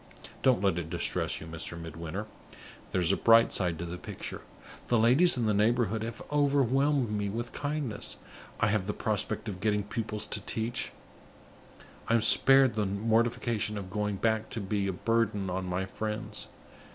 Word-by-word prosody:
Don't 125 Hz, -6 st, +3 dB
let 95 Hz, -3 st, +2 dB
it 80 Hz, -2 st, -6 dB
distress -, -, 0 dB
you, -, -, -9 dB
Mr. 80 Hz, +1 st, -5 dB
Midwinter! 85 Hz, +5 st, -6 dB, 0.6 s
There's 90 Hz, -1 st, +1 dB
a -, -, +3 dB
bright 115 Hz, +2 st, +5 dB
side 90 Hz, -4 st, +1 dB
to 85 Hz, -, -4 dB
the 90 Hz, +1 st, -6 dB
picture. -, -, -7 dB, 0.5 s
The 120 Hz, -, +3 dB
ladies 130 Hz, +10 st, +5 dB
in 120 Hz, -, 0 dB
the 105 Hz, -, +2 dB
neighborhood 110 Hz, +1 st, +2 dB
have 115 Hz, 0 st, -5 dB
overwhelmed 140 Hz, -3 st, +2 dB
me 105 Hz, -1 st, -1 dB
with 115 Hz, +3 st, -4 dB
kindness; 145 Hz, -6 st, -3 dB, 0.4 s
I -, -, +3 dB
have 100 Hz, -2 st, 0 dB
the 105 Hz, -, -1 dB
prospect 105 Hz, +1 st, -1 dB
of 95 Hz, -3 st, -5 dB
getting 105 Hz, 0 st, +1 dB
pupils 105 Hz, +1 st, -4 dB
to 105 Hz, -, -4 dB
teach; 115 Hz, +3 st, -3 dB, 1.2 s
I 115 Hz, -, +3 dB
am 115 Hz, -, +3 dB
spared 135 Hz, +2 st, +5 dB
the 105 Hz, -2 st, 0 dB
mortification 110 Hz, +1 st, 0 dB
of 95 Hz, -2 st, -7 dB
going 105 Hz, 0 st, -1 dB
back 110 Hz, +2 st, 0 dB
to 115 Hz, -, -4 dB
be 100 Hz, 0 st, -1 dB
a -, -, 0 dB
burden 105 Hz, -1 st, 0 dB
on 95 Hz, +1 st, -2 dB
my 90 Hz, +1 st, -1 dB
friends. 105 Hz, +3 st, -5 dB
105 Hz, 170 wpm, -29 LUFS, 95-115 Hz, 1.2 s, bright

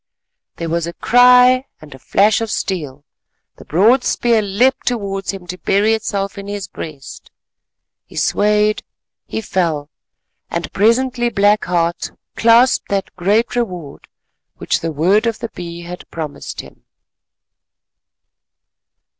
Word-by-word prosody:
There 170 Hz, -, -5 dB
was 170 Hz, 0 st, -1 dB
a 170 Hz, -, -5 dB
cry 250 Hz, +3 st, +5 dB
and 155 Hz, -2 st, -13 dB
a 135 Hz, -, -13 dB
flash 205 Hz, -, +2 dB
of 225 Hz, -, -2 dB
steel; 150 Hz, -9 st, -4 dB, 0.5 s
the -, -, -13 dB
broad 225 Hz, -, +3 dB
spear 235 Hz, -2 st, +2 dB
leapt 235 Hz, +7 st, +1 dB
towards 200 Hz, -5 st, -2 dB
him 195 Hz, -3 st, -4 dB
to 180 Hz, +1 st, -7 dB
bury 205 Hz, +3 st, +2 dB
itself 200 Hz, -2 st, -3 dB
in 200 Hz, -, -8 dB
his 200 Hz, -2 st, -5 dB
breast. 150 Hz, -5 st, -9 dB, 0.8 s
He -, -, -16 dB
swayed, 210 Hz, +1 st, +2 dB, 0.5 s
he 220 Hz, -, -3 dB
fell, 165 Hz, -7 st, -2 dB, 0.6 s
and -, -, -4 dB
presently 240 Hz, +3 st, +2 dB
Black 205 Hz, -1 st, +2 dB
Heart 170 Hz, -1 st, -1 dB, 0.2 s
clasped 235 Hz, +3 st, +4 dB
that 195 Hz, -1 st, -2 dB
great 210 Hz, +7 st, +1 dB
reward 180 Hz, -12 st, -4 dB, 0.5 s
which -, -, -1 dB
the 165 Hz, -, -3 dB
word 185 Hz, +9 st, +2 dB
of 225 Hz, -1 st, -1 dB
the 230 Hz, -, -5 dB
Bee 170 Hz, -3 st, -8 dB
had 180 Hz, +1 st, -9 dB
promised 155 Hz, -3 st, -6 dB
Him. -, -, -17 dB
200 Hz, 130 wpm, -18 LUFS, 170-230 Hz, 0.8 s, cry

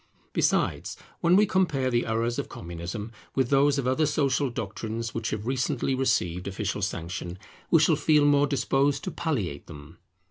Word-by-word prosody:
Besides, -, -, 0 dB, 0.2 s
when 175 Hz, +1 st, +4 dB
we 210 Hz, +2 st, +6 dB
compare 155 Hz, -10 st, +1 dB
the 120 Hz, -1 st, +1 dB
errors 115 Hz, +1 st, 0 dB
of -, -, -4 dB
Communism 85 Hz, +6 st, -6 dB, 0.2 s
with 130 Hz, -2 st, +1 dB
those 140 Hz, +1 st, +4 dB
of 135 Hz, -, -1 dB
other 130 Hz, +4 st, +2 dB
social 140 Hz, -2 st, +1 dB
doctrines 110 Hz, 0 st, -4 dB
which 115 Hz, -1 st, -2 dB
have 105 Hz, 0 st, -4 dB
recently 130 Hz, +1 st, 0 dB
received 90 Hz, -9 st, 0 dB
official 100 Hz, +1 st, -3 dB
sanction, 90 Hz, -1 st, -4 dB, 0.3 s
we 165 Hz, -, +6 dB
shall 155 Hz, +1 st, +4 dB
feel 150 Hz, 0 st, +3 dB
more 145 Hz, 0 st, +4 dB
disposed 140 Hz, 0 st, +1 dB
to 185 Hz, -, -3 dB
palliate 105 Hz, -, -3 dB
them. 75 Hz, +1 st, -12 dB
125 Hz, 165 wpm, -27 LUFS, 100-145 Hz, 0.3 s, we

